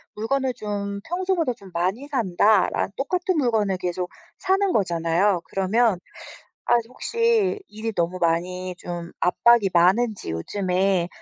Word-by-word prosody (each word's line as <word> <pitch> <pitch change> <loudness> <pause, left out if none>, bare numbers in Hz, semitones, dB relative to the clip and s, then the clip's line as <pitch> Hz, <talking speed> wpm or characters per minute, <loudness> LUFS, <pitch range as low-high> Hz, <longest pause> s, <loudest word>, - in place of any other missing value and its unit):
물건을 260 +4 -1
좀 200 -1 -4
평소보다 355 -5 0
좀 200 -4 -15
많이 185 +11 -1
산다. 215 -5 +3
라 - - -1
똑같은 360 +5 -1
물건을 220 -8 +1
계속 180 0 -3 0.3
사는 385 0 +1
거잖아요. 175 0 +1
그러면 195 +1 +1 0.7
아 - - +6
혹시 450 - +1
일이 220 +1 -5
너무 175 +1 -1
많이 180 +2 -1
좀 175 -1 -6
압박이 220 +2 +4
많은지 190 - +2
요즘에 185 - 0
200 Hz, 270 characters per minute, -23 LUFS, 180-250 Hz, 0.7 s, 아